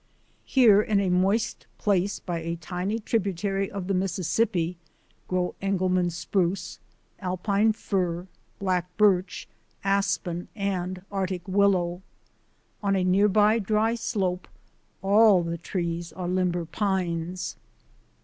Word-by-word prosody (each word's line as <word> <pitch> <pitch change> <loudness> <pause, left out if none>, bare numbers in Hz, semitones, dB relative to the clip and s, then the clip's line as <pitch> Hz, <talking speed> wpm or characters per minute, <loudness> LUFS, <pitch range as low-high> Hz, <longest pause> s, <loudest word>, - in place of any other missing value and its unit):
Here, 225 -6 +6
in 210 -1 +1
a 190 -2 +1
moist 195 +5 +1
place 200 -1 +1
by 175 -2 -4
a 165 +1 -3
tiny 180 +5 -3
tributary 195 -2 -1
of 195 -2 -5
the 195 - -1
Mississippi, 180 0 0 0.5
grow 180 -1 -1
Engelmann 185 -2 +1
spruce, 175 +1 -2 0.4
Al 185 -1 -2
pine 205 +3 +2
fir, 180 -5 -2 0.3
black 185 -2 0
birch, 190 -3 +2 0.4
aspen, 195 -3 0
and 185 -3 -2
Arctic 185 -2 -3
willow. 185 -2 +2 0.8
On 200 -1 +1
a 190 - +1
near 190 +3 +4
by 210 +2 +4
dry 215 +2 +1
slope 195 -6 -2 0.6
all 200 -2 +5
the 170 0 -3
trees 170 -1 -3
are 180 -1 -5
limber 180 -1 0
pines. 180 -2 -2
185 Hz, 120 wpm, -26 LUFS, 180-200 Hz, 0.8 s, Here